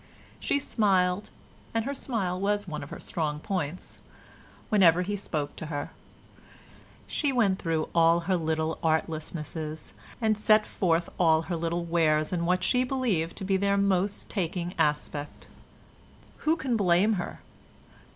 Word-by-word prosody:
She - - +1
smiled 195 -6 +1 0.5
(and 225 0 +1
her 280 - -2
smile 200 -10 -2
was 205 +1 0
one 155 -3 -5
of 145 - -8
her - - -8
strong 150 -3 -2
points) 180 -2 -4 0.7
whenever 180 -6 +5
he 205 +3 -2
spoke 150 -7 -3
to 160 - -6
her; 145 -2 -4 1.1
she 290 -2 0
went 205 -7 +2
through 160 -2 -1
all 165 0 +4
her 185 +2 0
little 160 -1 -1
artlessnesses 155 -1 -3 0.3
and 220 -2 +2
set 215 0 +4
forth 170 -2 0
all 160 -2 +4
her 175 - -3
little 170 +1 -2
wares 155 -1 +2
in 170 -1 0
what 180 +1 +1
she 250 0 +3
believed 235 -11 -1
to 195 - -5
be 195 0 +2
their 200 +1 +1
most 200 0 +1
taking 175 -2 -2
aspect. 150 -1 -1 0.9
Who 315 +1 +1
can 265 -6 -1
blame 195 +1 +3
her? - - -7
180 Hz, 145 wpm, -28 LUFS, 160-205 Hz, 1.1 s, whenever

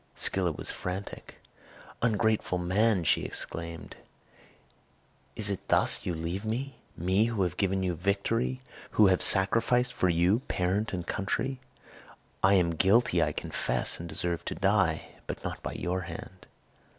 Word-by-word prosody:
Scylla 90 -3 +1
was 75 - -4
frantic. 95 +2 -6 0.7
"Ungrateful 110 -4 +1
man," 95 +2 +2
she 80 - +2
exclaimed, 85 -1 -6 1.4
"is 105 -2 -1
it 100 - -5
thus - - +2
you 90 - -1
leave 85 +5 -4
me? 125 +4 -3 0.2
me 95 +5 +2
who 115 -4 0
have 90 - -2
given 95 -1 0
you 90 -1 0
victory, 100 +8 -1 0.3
who 110 - +7
have 90 - -1
sacrificed 120 +6 +4
for 95 - +1
you 85 +6 +3
parent 95 +4 0
and 90 -2 -4
country! 125 +6 -2 0.8
I 95 +1 +5
am 90 -3 +3
guilty, 100 +8 +3
I - - +2
confess, - - -2
and 85 0 -7
deserve 85 -1 -1
to - - -3
die, 95 -5 +1 0.2
but - - -6
not - - -5
by - - -5
your 90 +1 -2
hand." 90 +1 -9
95 Hz, 145 wpm, -29 LUFS, 90-110 Hz, 1.4 s, who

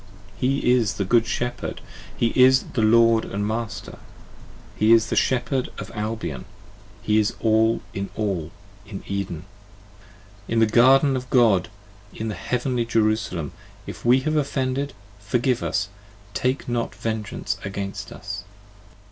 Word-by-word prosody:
He 130 -1 +1
is 115 -5 +2
the 100 - -1
Good 115 +3 +3
shepherd, 120 0 -3 0.4
he 115 - +2
is 130 0 +6
the 115 - +1
Lord 115 +1 +5
and 100 +1 -3
master: 110 0 -4 0.8
He 110 +2 +5
is 115 -1 +3
the - - +1
Shepherd 130 0 +1
of - - -7
Albion, 105 - -4 0.6
he 105 0 +3
is 105 0 0
all 110 0 +2
in 100 0 -4
all, 95 -7 -2 0.4
25 - - -23
In 100 -2 -7
Eden: 90 -4 -4 1.0
in 115 - -1
the 115 - +6
garden 130 +5 +5
of 125 -1 -5
God: 110 -6 +4 0.4
and - - -13
in 110 0 -2
heavenly 125 +2 -1
Jerusalem. 110 - 0 0.3
If - - -8
we 125 +2 +5
have 155 +3 -1
offended, 140 -1 -1 0.3
forgive 120 +4 0
us, 105 +2 -1 0.5
take 130 +2 -1
not 120 -1 -2
vengeance 110 -2 -3
against 100 0 -5
us. 100 +3 -6
115 Hz, 140 wpm, -23 LUFS, 105-125 Hz, 1.0 s, is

